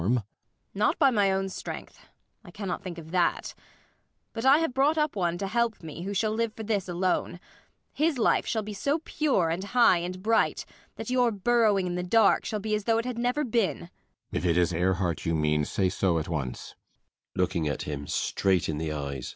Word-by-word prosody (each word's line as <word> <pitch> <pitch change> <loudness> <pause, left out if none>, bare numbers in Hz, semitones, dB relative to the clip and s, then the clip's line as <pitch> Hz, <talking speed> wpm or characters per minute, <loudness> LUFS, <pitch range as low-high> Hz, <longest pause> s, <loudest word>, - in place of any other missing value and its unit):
Not 210 - +1
by 275 -5 +5
my 205 -4 +3
own 195 0 0
strength. 190 - -8 0.4
I - - -13
cannot 200 -4 -4
think 180 -3 -6
of 160 -1 -10
that. 180 -1 0 0.8
But 225 +2 -4
I 270 +2 +7
have 325 -5 -1
brought 280 +4 +2
up 300 -4 +1
one 175 -3 0
to 195 - -3
help 230 0 -1
me, 160 +1 -7
who 195 +3 -4
shall 215 +2 +1
live 220 0 -1
for 220 - -6
this 205 -4 -1
alone. 175 0 -1 0.5
His 310 -1 +1
life 230 - +2
shall 220 -2 -1
be 210 0 -6
so 280 +9 0
pure 225 - +1
and 175 +3 -2
high 215 -4 +4
and 180 +2 -5
bright, 225 +1 +1 0.3
that - - -6
your 250 -2 +3
burrowing 210 -2 +2
in 180 - -2
the 180 - -2
dark 200 +3 +3
shall 215 - -2
be 215 +1 -3
as 210 -1 -1
though 225 -1 +3
it 230 - -1
had 250 -2 -4
never 250 +5 0
been! 215 -7 -1
215 Hz, 150 wpm, -27 LUFS, 185-240 Hz, 0.8 s, I